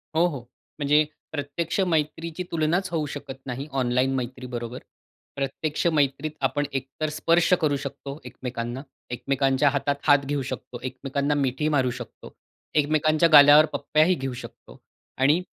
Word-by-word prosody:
हो, 165 +2 +4
हो. 145 -6 -4 0.4
म्हणजे 150 +1 +4 0.3
प्रत्यक्ष 160 +4 -3
मैत्रीची 160 +3 -2
तुलनाच 165 +3 0
होऊ 160 -3 0
शकत 140 -1 -7
नाही, 130 +3 -5
ऑनलाईन 130 0 +1
मैत्रीबरोबर. 125 -1 -5 0.6
प्रत्यक्ष 140 +3 -2
मैत्रीत 145 -1 +1
आपण 145 -1 +1
एकतर 135 +4 -3
स्पर्श 170 +2 +3
करू 150 -2 +2
शकतो 140 0 -7
एकमेकांना, 120 0 -5 0.3
एकमेकांच्या 135 +2 +1
हातात 140 0 0
हात 145 -1 +4
घेऊ 145 0 -1
शकतो, 120 - -7
एकमेकांना 135 +2 -2
मिठी 140 +1 0
मारू 130 -2 +2
शकतो, - - -11 0.4
एकमेकांच्या 155 +2 +3
गालावर 145 +1 +9
पप्प्याही 155 +4 +2
घेऊ 135 -3 -4
शकतो - - -13 0.4
आणि 145 +5 +4
145 Hz, 130 wpm, -25 LUFS, 135-155 Hz, 0.6 s, गालावर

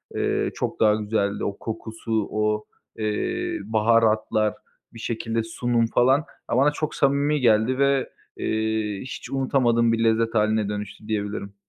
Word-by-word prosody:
eee, - - 0
çok - - -3
daha 105 -1 +5
güzeldi. 105 -1 -1
O 100 - -2
kokusu, 110 -1 -3
o, 105 0 0 0.3
eee, 345 - -2
baharatlar, 110 -1 +2 0.4
bir 115 - -11
şekilde 115 0 -2
sunum 115 +1 0
falan. 130 +4 +4 0.3
Ya, 120 - +2
bana 145 +3 +4
çok 155 0 -3
samimi 140 +2 +2
geldi 115 +2 +3
ve, 140 -1 +2 0.3
eee, 110 -2 -1
hiç 130 - -7
unutamadığım 125 -4 +2
bir 115 0 +1
lezzet 115 0 +2
hâline 110 -1 +2
dönüştü 105 +1 -6
diyebilirim. 105 -1 -3
115 Hz, 140 wpm, -24 LUFS, 110-125 Hz, 0.4 s, daha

